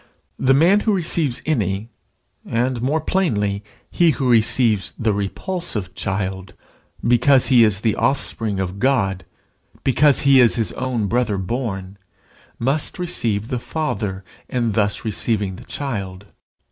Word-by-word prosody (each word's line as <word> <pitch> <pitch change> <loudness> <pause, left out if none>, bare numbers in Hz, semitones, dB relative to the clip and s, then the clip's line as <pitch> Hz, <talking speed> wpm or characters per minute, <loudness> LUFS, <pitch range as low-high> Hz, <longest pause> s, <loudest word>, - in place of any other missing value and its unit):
The 135 0 +4
man 175 +8 +5
who 210 -1 +1
receives 160 -7 0
any, 110 - -1 0.5
and 120 +1 -1
more 145 +6 0
plainly 105 - 0 0.3
he 170 -1 +3
who 135 -3 0
receives 110 -2 +2
the 110 -2 +1
repulsive 105 - -4
child, 95 -2 -4 0.5
because 125 +3 +4
he 125 -3 +6
is 105 -3 +1
the 110 -2 +1
offspring 110 -7 -1
of 95 +1 -3
God, 95 -8 +1 0.6
because 140 +2 +4
he 140 -1 +5
is 120 -2 +5
his 110 -7 0
own 125 -2 -2
brother 115 -1 0
born, 95 -2 -4 0.6
must 135 +5 -1
receive 115 - -2
the 125 -3 -2
Father 110 -10 -3 0.3
in 120 -3 0
thus 105 +1 0
receiving 105 -3 -1
the - - -12
child. 100 -8 -5
115 Hz, 135 wpm, -20 LUFS, 100-135 Hz, 0.6 s, he